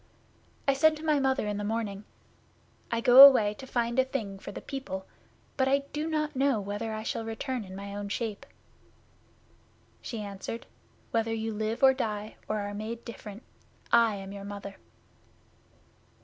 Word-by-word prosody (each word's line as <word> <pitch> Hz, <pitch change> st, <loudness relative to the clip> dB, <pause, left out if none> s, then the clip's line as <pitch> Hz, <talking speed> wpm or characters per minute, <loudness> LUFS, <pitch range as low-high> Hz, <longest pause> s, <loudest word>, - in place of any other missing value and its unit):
'I 275 Hz, -, +5 dB
said 310 Hz, +3 st, +4 dB
to 310 Hz, -, -8 dB
my 305 Hz, -2 st, +3 dB
Mother 265 Hz, -3 st, +1 dB
in 205 Hz, -1 st, -2 dB
the 205 Hz, -, -3 dB
morning, 210 Hz, -2 st, -3 dB, 0.8 s
"I 230 Hz, 0 st, -1 dB
go 250 Hz, +3 st, +10 dB
away 235 Hz, -7 st, +8 dB
to 265 Hz, +5 st, -11 dB
find 235 Hz, 0 st, 0 dB
a -, -, +6 dB
thing 220 Hz, -7 st, -4 dB
for -, -, -8 dB
the -, -, -7 dB
people, 190 Hz, -9 st, -6 dB, 0.5 s
but 265 Hz, -1 st, +2 dB
I 275 Hz, +1 st, +2 dB
do 300 Hz, +2 st, -2 dB
not 305 Hz, -2 st, -1 dB
know 270 Hz, -3 st, +2 dB
whether 205 Hz, +3 st, -4 dB
I 215 Hz, 0 st, -4 dB
shall 225 Hz, -, -3 dB
return 225 Hz, +2 st, -4 dB
in 190 Hz, -1 st, -10 dB
my 200 Hz, +1 st, -7 dB
own 205 Hz, 0 st, -5 dB
shape." 215 Hz, -1 st, -4 dB, 1.5 s
She 230 Hz, -, -5 dB
answered, 200 Hz, +3 st, -6 dB, 0.5 s
"Whether 225 Hz, 0 st, 0 dB
you 225 Hz, 0 st, -3 dB
live 220 Hz, +4 st, -2 dB
or 265 Hz, 0 st, +8 dB
die, 215 Hz, -4 st, -4 dB
or 215 Hz, -1 st, -1 dB
are 205 Hz, 0 st, -4 dB
made 220 Hz, +3 st, -6 dB
different, 215 Hz, -2 st, -9 dB, 0.5 s
I 230 Hz, -3 st, +5 dB
am 195 Hz, 0 st, -7 dB
your 200 Hz, 0 st, -8 dB
Mother." 200 Hz, -1 st, -7 dB
225 Hz, 170 wpm, -29 LUFS, 205-265 Hz, 1.5 s, go